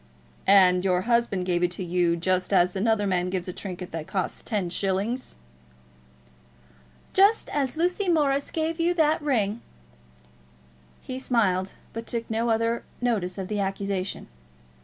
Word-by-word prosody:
"And 185 -2 +6
your 180 -2 +2
husband 235 -4 +1
gave 175 -1 0
it 180 0 0
you 175 -1 +1
just 185 +2 0
as 180 -1 +3
another 210 +1 +1
man 180 -2 0
gives 185 -1 -3
a 180 - -4
trinket 180 -2 -7
that 160 -1 -5
costs 190 -2 -2
ten 200 -6 -2
shillings!" 200 +7 -2 1.8
"Just 405 +3 +4
as 280 0 -1
Lucy 360 +3 0
Morris 285 -4 +2
gave 325 +1 -2
you 345 +1 +2
that 315 -1 +2
ring." 235 -6 0 1.4
He 255 0 -5
smiled, 195 -8 +1 0.2
but 230 0 -6
took 230 -1 -2
no 230 +2 0
other 230 +1 +1 0.2
notice 210 -7 -1
of 190 -1 -4
the 210 0 -2
accusation. 195 -1 -3
200 Hz, 140 wpm, -26 LUFS, 185-245 Hz, 1.8 s, And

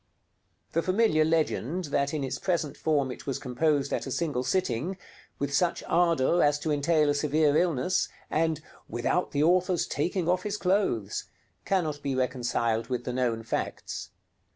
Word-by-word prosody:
The 165 - +1
familiar 185 -4 +3
legend 160 +1 0
that 140 0 +2
in 150 -3 -2
its 130 - -3
present 165 -6 -1
form 145 -4 +1
it - - -10
was 135 - -1
composed 145 +2 0
at - - -2
a - - -5
single 145 -5 -1
sitting, 180 +3 -1 0.4
with 140 0 -2
such 175 +3 +1
ardor 170 -1 +3
as 145 0 +4
to 155 - -1
entail 150 +1 +2
a - - +2
severe 150 0 +2
illness, 170 +1 +1 0.2
and 160 -1 +1 0.3
"without 120 +10 0
the 145 +1 +1
author's 180 +1 +3
taking 170 +3 -1
off 180 +1 +2
his 210 +1 -3
clothes," 180 - 0 0.4
cannot 160 -7 0
be 140 -2 -2
reconciled 120 -3 0
with 125 -1 -2
the 125 - -3
known 120 -3 0
facts. 115 - -4
150 Hz, 160 wpm, -28 LUFS, 130-175 Hz, 0.4 s, as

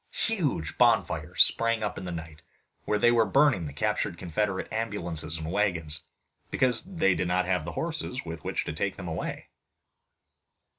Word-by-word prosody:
Huge 155 - -1
bonfires - - +4
sprang 115 -1 +1
up 105 - -2
in 95 - -7
the 90 - -4
night, 80 -2 -7 0.4
where 105 - +1
they 120 +3 +5
were 115 -1 +5
burning 130 - +3
the - - -6
captured 70 +4 -1
Confederate 95 +2 -1
ambulances 85 -8 -3
and 80 +1 -5
wagons, 85 -7 0 0.5
because 125 -3 +2
they 170 - +2
did 90 - -1
not 90 +1 +2
have 90 -4 0
the 85 - -5
horses 160 - -3
with 80 -2 -6
which - - -2
to - - -3
take - - -1
them - - -7
away. - - -4
95 Hz, 165 wpm, -28 LUFS, 80-115 Hz, 0.5 s, they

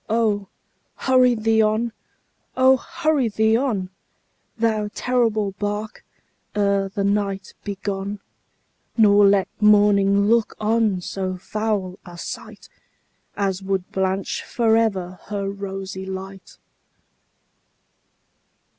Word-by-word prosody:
Oh! 215 -3 +1 0.5
hurry 255 -2 +3
thee 220 0 +2
on 220 +2 +1 0.6
oh! 260 +1 +6
hurry 310 -3 0
thee 220 +1 +2
on, 220 -8 -1 0.7
Thou 220 -2 0
terrible 225 -5 +1
bark, 205 +1 -4 0.5
ere 200 -1 +1
the 200 +1 -3
night 200 -1 -1
be 200 - -4
gone, 200 0 -3 0.8
Nor 205 -2 +6
let 195 -1 +3
morning 200 -1 +5
look 230 0 +2
on 215 -3 +1
so 185 0 -4
foul 200 -1 -3
a 175 -1 -11
sight - - -8 0.7
As 195 -2 -1
would 190 -1 -2
blanch 190 0 -1
for 225 -2 +2
ever 190 -5 0
her 200 -1 -3
rosy 195 -1 -6
light! 190 0 -8
205 Hz, 105 wpm, -22 LUFS, 195-220 Hz, 0.8 s, oh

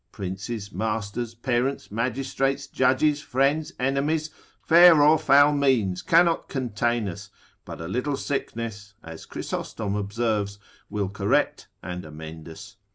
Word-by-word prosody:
princes, 100 +3 -5
masters, 110 +3 -3
parents, 125 +2 -1
magistrates, 135 +4 -1
judges, 140 +3 +2
friends, 140 +3 0
enemies, 145 +4 0 0.3
fair 170 -1 +7
or 150 +2 +6
foul 145 +2 +5
means 125 -10 +1
cannot 170 0 +3
contain 120 -3 -1
us, 100 +3 -7 0.4
but - - -8
a 80 - -6
little 125 - -2
sickness, 110 -7 -4
(as 80 0 -10
Chrysostom 105 -3 -4
observes) 105 0 -1 0.3
will 100 -2 -2
correct 100 +9 0 0.2
and 90 0 -5
amend 80 +1 -9
us. 95 +3 -12
120 Hz, 120 wpm, -25 LUFS, 100-140 Hz, 0.4 s, fair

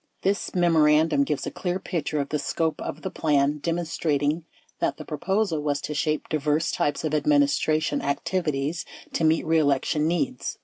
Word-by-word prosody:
20 195 - +4
This 200 - -7
memorandum 155 -3 +4
gives 150 0 -2
a - - -4
clear 180 -1 -2
picture 155 -5 -2
of 140 - -2
the 150 - -1
scope 160 +1 -1
of 155 - -6
the 190 - -3
plan, 145 -1 +1
demonstrating 160 -2 -1 0.3
that - - 0
the 155 - -8
proposal 180 +2 -1
was 145 -1 0
to 150 - -4
shape 155 0 -1
diverse 155 +1 0
types 145 +1 -1
of 155 - -1
admin 145 -1 +4
istration 155 +2 0
activities 150 +1 -1 0.3
to - - 0
meet 160 +1 +3
reelection 155 -1 +2
needs. 250 +10 -2
155 Hz, 170 wpm, -25 LUFS, 145-165 Hz, 0.3 s, 20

